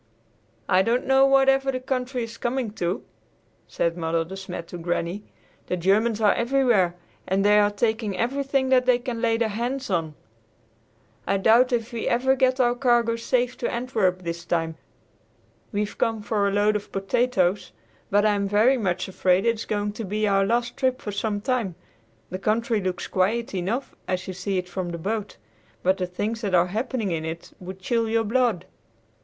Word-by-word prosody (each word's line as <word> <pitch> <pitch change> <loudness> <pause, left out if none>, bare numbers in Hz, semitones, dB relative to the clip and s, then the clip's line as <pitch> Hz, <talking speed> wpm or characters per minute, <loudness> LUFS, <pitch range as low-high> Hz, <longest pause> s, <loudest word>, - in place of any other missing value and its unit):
"I 185 - +4
don't 235 +5 +1
know 270 0 +5
whatever 270 0 +4
the 255 - -3
country 255 -1 -2
is 230 0 -7
coming 245 -2 -1
to," 180 -2 -2 0.6
said 170 0 -1
Mother 165 -1 -1
De 190 +4 -8
Smet 180 -3 -7
to 175 - -7
Granny. 175 +3 -2 0.5
"The 180 - -1
Germans 210 +5 +2
are 210 -2 +4
everywhere, 235 -8 +2 0.3
and 195 +1 +1
they 210 0 +6
are 205 0 +4
taking 215 -1 -1
everything 270 +3 0
that 255 -1 +3
they 250 -1 +5
can 245 -2 -5
lay 230 -1 +2
their 230 -1 0
hands 240 +3 -3
on. 160 -4 -1 1.1
I 195 - +2
doubt 230 +6 +4
if 235 0 -1
we 230 - -3
ever 265 +3 +2
get 260 0 +2
our 240 -1 +4
cargo 240 -2 +2
safe 245 +1 0
to - - -1
Antwerp 215 -7 0
this 170 0 -4
time. 165 -2 -1 1.0
We've 210 0 -2
come 225 -2 -1
for 205 -1 +1
a - - 0
load 205 +1 +2
of 205 0 -4
potatoes, 195 -1 0 0.4
but 205 +1 +3
I 210 - +4
am 200 -1 0
very 220 +7 +4
much 185 -3 -1
afraid 185 +1 +2
it 230 - +4
is 225 - -7
going 205 -1 -1
to 220 +2 -6
be 210 +2 -1
our 195 -1 +3
last 235 +2 0
trip 260 -2 +1
for 205 - -5
some 205 0 -2
time. 225 -7 -1 0.6
The 185 - -4
country 220 +1 0
looks 185 -1 -3
quiet 210 +5 0
enough 195 +9 -2
as 185 -1 -2
you 190 - -4
see 195 +1 -2
it 180 0 -2
from 180 0 -4
the 170 - -4
boat, 205 +4 -4 0.5
but 190 +1 +3
the 180 - -1
things 215 +5 -3
that 200 -5 0
are 175 0 +5
happening 225 -3 -2
in 160 -1 -2
it 160 +1 -6
would 185 +1 -8
chill 230 +3 0
your 225 0 +2
blood." 225 -5 +1
215 Hz, 190 wpm, -24 LUFS, 185-240 Hz, 1.1 s, they